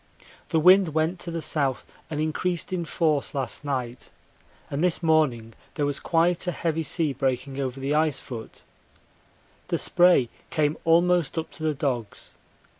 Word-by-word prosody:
The 165 Hz, -, +2 dB
wind 180 Hz, -1 st, +5 dB
went 160 Hz, +3 st, +1 dB
to 175 Hz, -, -6 dB
the 165 Hz, -1 st, -4 dB
south 140 Hz, -5 st, -1 dB, 0.2 s
and 155 Hz, -2 st, -3 dB
increased 170 Hz, +4 st, -2 dB
in 175 Hz, -2 st, -1 dB
force 155 Hz, -3 st, 0 dB
last 135 Hz, +1 st, -3 dB
night, 130 Hz, -4 st, -4 dB, 0.6 s
and 145 Hz, +3 st, -1 dB
this 180 Hz, -1 st, +1 dB
morning 135 Hz, -9 st, +2 dB, 0.2 s
there 145 Hz, -, 0 dB
was 145 Hz, -1 st, -1 dB
quite 170 Hz, +2 st, +1 dB
a -, -, +2 dB
heavy 165 Hz, -1 st, -1 dB
sea 155 Hz, -1 st, -1 dB
breaking 135 Hz, +1 st, -2 dB
over 135 Hz, -1 st, -3 dB
the 135 Hz, +2 st, -1 dB
ice 155 Hz, -2 st, +2 dB
foot. 115 Hz, -4 st, -9 dB, 1.0 s
The -, -, 0 dB
spray 175 Hz, -9 st, +4 dB, 0.2 s
came 150 Hz, 0 st, +1 dB
almost 170 Hz, -1 st, +3 dB
up 160 Hz, -, -3 dB
to -, -, -14 dB
the 155 Hz, -1 st, 0 dB
dogs. 125 Hz, -6 st, -3 dB
155 Hz, 160 wpm, -25 LUFS, 135-165 Hz, 1.0 s, wind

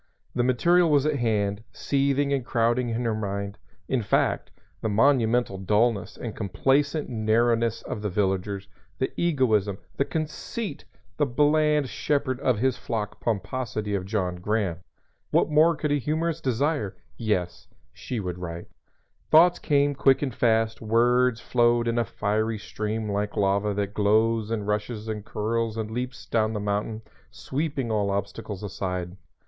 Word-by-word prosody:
The -, -, +1 dB
material 170 Hz, +8 st, +4 dB
was 145 Hz, -2 st, +3 dB
at 155 Hz, -2 st, +1 dB
hand, 105 Hz, -3 st, 0 dB
seething 140 Hz, +4 st, +1 dB
and 135 Hz, -3 st, 0 dB
crowding 120 Hz, +1 st, +1 dB
in 115 Hz, +1 st, -2 dB
her 115 Hz, -, +1 dB
mind, 100 Hz, -1 st, -4 dB, 0.3 s
in 130 Hz, -2 st, +1 dB
fact 100 Hz, -, +1 dB, 0.3 s
the 110 Hz, -, -1 dB
monumental 115 Hz, -2 st, +2 dB
dullness 105 Hz, +2 st, +1 dB
and 115 Hz, -3 st, -6 dB
complacent 140 Hz, -, +1 dB
narrowness 115 Hz, 0 st, +1 dB
of 115 Hz, -, -5 dB
the 105 Hz, -, -1 dB
villagers, 95 Hz, 0 st, -1 dB, 0.3 s
the 130 Hz, -, -1 dB
egoism, 110 Hz, -, +1 dB, 0.2 s
the 140 Hz, -, +2 dB
conceit, 155 Hz, -, -4 dB, 0.3 s
the 145 Hz, -, +2 dB
bland 150 Hz, +2 st, +3 dB
shepherd 130 Hz, -2 st, -1 dB
of 130 Hz, -4 st, +1 dB
his 130 Hz, +3 st, +1 dB
flock 105 Hz, -3 st, -4 dB
pomposity 110 Hz, -1 st, -2 dB
of 95 Hz, -1 st, -2 dB
John 95 Hz, -4 st, -1 dB
Graham. 100 Hz, -2 st, -1 dB, 0.5 s
What -, -, +2 dB
more 160 Hz, +3 st, +5 dB
could 150 Hz, -1 st, -2 dB
a 145 Hz, -, +2 dB
humorist 160 Hz, +3 st, -1 dB
desire? 135 Hz, -3 st, 0 dB, 0.2 s
Yes; 105 Hz, -6 st, -2 dB, 0.3 s
she 125 Hz, -, -5 dB
would 90 Hz, -3 st, -4 dB
write. 85 Hz, -1 st, -6 dB, 0.6 s
Thoughts 170 Hz, +3 st, +6 dB
came 145 Hz, -1 st, +2 dB
quick 135 Hz, 0 st, +3 dB
and 130 Hz, -4 st, -2 dB
fast; 115 Hz, -2 st, +1 dB
words 120 Hz, +2 st, +3 dB
flowed 120 Hz, -1 st, +2 dB
in 115 Hz, 0 st, +1 dB
a 120 Hz, -, +1 dB
fiery 110 Hz, +2 st, -1 dB
stream 110 Hz, +1 st, -4 dB
like 105 Hz, 0 st, -2 dB
lava 100 Hz, +1 st, +2 dB
that 100 Hz, 0 st, -2 dB
glows 110 Hz, +1 st, +2 dB
and 110 Hz, -3 st, -2 dB
rushes 105 Hz, +1 st, -2 dB
and 105 Hz, -2 st, -4 dB
curls 110 Hz, +1 st, -2 dB
and 110 Hz, -1 st, -3 dB
leaps 125 Hz, +2 st, -4 dB
down 110 Hz, -1 st, +1 dB
the 105 Hz, -, -2 dB
mountain, 105 Hz, +2 st, -2 dB, 0.3 s
sweeping 140 Hz, -4 st, -3 dB
all 105 Hz, -2 st, +1 dB
obstacles 100 Hz, 0 st, -4 dB
aside. 90 Hz, -3 st, -4 dB
115 Hz, 150 wpm, -26 LUFS, 105-130 Hz, 0.6 s, Thoughts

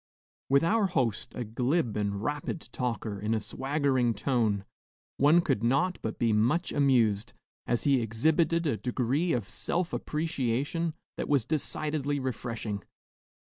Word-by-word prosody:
With 140 Hz, +2 st, +4 dB
our 205 Hz, +4 st, +3 dB
host, 125 Hz, -, -1 dB
a 125 Hz, -, -2 dB
glib 120 Hz, +3 st, 0 dB
and 100 Hz, -1 st, -1 dB
rapid 145 Hz, +4 st, -2 dB
talker 115 Hz, -5 st, -3 dB
in 105 Hz, +2 st, 0 dB
a -, -, +1 dB
swaggering 130 Hz, +2 st, 0 dB
tone, 105 Hz, -4 st, 0 dB, 0.5 s
one 150 Hz, +5 st, +5 dB
could 135 Hz, -9 st, 0 dB
not 155 Hz, +10 st, +2 dB
but 110 Hz, -, -4 dB
be 115 Hz, -2 st, +2 dB
much 125 Hz, +12 st, +2 dB
amused, 120 Hz, -7 st, +2 dB, 0.3 s
as 120 Hz, 0 st, +1 dB
he 135 Hz, -3 st, +3 dB
exhibited 160 Hz, +9 st, +2 dB
a 140 Hz, -8 st, +1 dB
degree 130 Hz, -, 0 dB
of 115 Hz, -8 st, -1 dB
self 175 Hz, +9 st, -2 dB
appreciation 150 Hz, +1 st, -1 dB, 0.2 s
that -, -, -3 dB
was 140 Hz, -6 st, +3 dB
decidedly 150 Hz, -1 st, -1 dB
refreshing. 115 Hz, -5 st, -3 dB
130 Hz, 135 wpm, -29 LUFS, 115-150 Hz, 0.5 s, one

